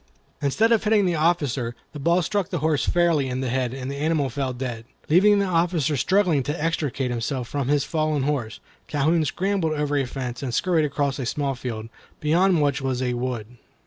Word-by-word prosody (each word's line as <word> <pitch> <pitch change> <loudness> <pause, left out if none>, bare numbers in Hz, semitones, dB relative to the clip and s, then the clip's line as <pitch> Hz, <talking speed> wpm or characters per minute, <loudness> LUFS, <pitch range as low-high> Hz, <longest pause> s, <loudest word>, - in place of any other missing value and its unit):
Instead 210 +12 +2
of 230 - +3
hitting 210 -2 +3
the 180 - +1
officer, 145 -7 0 0.2
the 150 - -7
ball 170 +5 +2
struck 200 0 -1
the 175 - -2
horse 155 -1 0
fairly 170 -6 +2
in 130 +1 -2
the 130 - -2
head, 125 -2 0
and 130 0 -5
the 140 - -5
animal 150 -3 0
fell 135 0 -2
dead. 125 -3 -5 0.3
Leaving 200 +6 +5
the 200 - +2
officer 165 -4 +1
struggling 175 +2 +2
to 145 +5 -3
extricate 145 -5 -1
himself 120 +1 -2
from 140 -1 -2
his 145 0 +2
fallen 155 -2 0
horse, 135 -7 -2 0.3
Calhoun 155 +3 +2
scrambled 185 0 0
over 150 -1 -1
a 140 -2 +1
fence, 125 -2 -5
and 130 -4 -3
scurried 170 -4 +2
across 140 -1 -1
a 130 - -2
small 140 0 -1
field, 115 -3 -5 0.3
beyond 170 +1 +3
which 140 -1 +1
was 130 -2 -1
a 125 -1 0
wood. 120 -2 -4
145 Hz, 200 wpm, -24 LUFS, 130-165 Hz, 0.3 s, Leaving